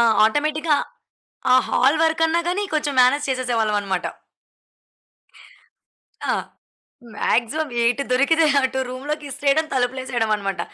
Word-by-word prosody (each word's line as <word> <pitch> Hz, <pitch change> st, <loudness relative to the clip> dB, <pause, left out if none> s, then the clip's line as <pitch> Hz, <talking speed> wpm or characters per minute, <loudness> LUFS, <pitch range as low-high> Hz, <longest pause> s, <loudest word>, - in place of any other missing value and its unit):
ఆ 235 Hz, -, +5 dB, 0.2 s
ఆటోమేటిక్‌గా, 300 Hz, +5 st, +1 dB, 0.8 s
ఆ -, -, +7 dB
హాల్ 275 Hz, +5 st, +3 dB
వరకన్నా 325 Hz, +1 st, +2 dB
గాని, 375 Hz, +4 st, -1 dB
కొంచెం 295 Hz, -2 st, -1 dB
మ్యానేజ్ 255 Hz, +4 st, +3 dB
చేసేసేవాళ్ళమన్నమాట. 215 Hz, -7 st, -1 dB, 2.2 s
ఆ! -, -, +3 dB, 0.8 s
మాక్సిమం 290 Hz, +7 st, 0 dB
ఎటు 245 Hz, +4 st, +1 dB
దొరికితే, 315 Hz, +6 st, +3 dB, 0.2 s
అటు 260 Hz, 0 st, -1 dB
రూ‌మ్‌‌లోకి 290 Hz, +4 st, -5 dB
ఇసిరేయడం 285 Hz, +3 st, +1 dB
తలుపులేసేయడమనమాట. 240 Hz, -6 st, -1 dB
265 Hz, 95 wpm, -21 LUFS, 240-305 Hz, 2.2 s, ఆ